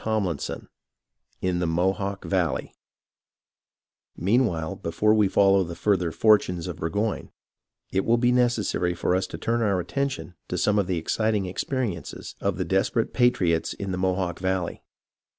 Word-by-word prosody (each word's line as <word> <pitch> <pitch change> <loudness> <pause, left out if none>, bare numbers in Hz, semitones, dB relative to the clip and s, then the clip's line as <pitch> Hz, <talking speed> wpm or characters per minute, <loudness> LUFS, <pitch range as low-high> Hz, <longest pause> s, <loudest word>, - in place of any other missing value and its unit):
CHAPTER 110 -2 +1
XXI 80 -5 -5 0.7
IN 90 -1 0
THE 90 - 0
MOHAWK 95 +4 -1
VALLEY 90 -5 -1 1.4
Meanwhile, 95 -6 +1
before 105 +6 +1
we 105 -2 +4
follow 100 0 +4
further 95 -1 +1
the - - -11
fortunes 95 -6 +3
of 90 -3 -5
Burgoyne, 100 +7 -2 0.6
it 95 0 +1
will 115 +1 +3
be 120 +1 +3
necessary 120 -8 +1
for 90 - +1
us 95 0 0
to - - -7
turn 115 +1 0
our 100 -4 +2
attention 135 +2 -3
to - - -3
some 105 0 +2
of 100 - 0
the 90 -2 0
exciting 105 +4 0
experiences 100 0 -4
of - - 0
the - - -1
desperate - - 0
patriots 90 -10 +2
in 100 -1 -5
the 90 - -2
Mohawk 95 -1 -1
Valley. 95 -2 -2
95 Hz, 150 wpm, -25 LUFS, 90-110 Hz, 1.4 s, we